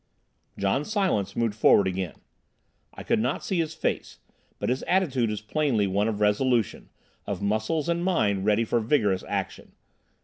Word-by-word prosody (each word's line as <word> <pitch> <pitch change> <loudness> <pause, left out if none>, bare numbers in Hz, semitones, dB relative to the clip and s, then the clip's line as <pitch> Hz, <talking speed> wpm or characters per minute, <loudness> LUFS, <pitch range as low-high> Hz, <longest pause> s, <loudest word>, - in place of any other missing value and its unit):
John 100 +8 +1
Silence 190 - 0
moved 115 -2 0
forward 105 -1 +5
again. 95 -2 -3 0.8
I - - -10
could - - +1
not 120 +4 -1
see 190 -3 -1
his 160 -1 -2
face, - - -3 0.4
but - - -2
his 130 +1 0
attitude 135 - +1
was 105 -1 -3
plainly 115 -2 0
one 100 +2 +1
of 110 -2 -2
resolution, 110 +2 +1 0.4
of - - -3
muscles 110 +10 0
and 170 0 0
mind 105 - +1
ready 105 +2 +2
for 120 - +1
vigorous 110 -5 +1
action. - - -4
115 Hz, 160 wpm, -26 LUFS, 105-150 Hz, 0.8 s, forward